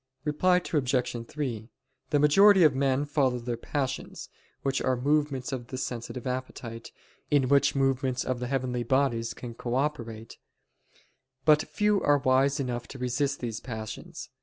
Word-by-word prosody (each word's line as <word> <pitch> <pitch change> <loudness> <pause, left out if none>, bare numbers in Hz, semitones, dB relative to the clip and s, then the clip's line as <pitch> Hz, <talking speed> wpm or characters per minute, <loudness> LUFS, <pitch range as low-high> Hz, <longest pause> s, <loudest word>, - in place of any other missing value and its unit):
Reply 155 +5 +2
Obj. 125 -8 -1
3: 120 -7 -4 0.4
The 150 - +2
majority 190 +6 +6
of 155 -3 +6
men 135 +1 +1
follow 140 -4 +1
their 120 0 -3
passions, 130 +3 -4 0.3
which 135 0 0
are 130 -1 +1
movements 140 -1 0
of 125 -3 -5
the 130 - -6
sensitive 120 -1 -5
appetite, 125 -3 -5 0.4
in 140 -3 +3
which 140 0 +4
movements 135 -2 0
of 130 -1 -2
the 125 - -3
heavenly 130 -2 -1
bodies 120 -2 0
can 120 -2 -7
cooperate: 120 -3 -3 1.1
but 155 -1 +6
few 210 -1 +1
are 145 0 +4
wise 135 +2 +2
enough 120 -3 -3
to 135 - -9
resist 135 +3 -1
these 115 -3 -3
passions. 110 -3 -7
130 Hz, 145 wpm, -28 LUFS, 120-145 Hz, 1.1 s, majority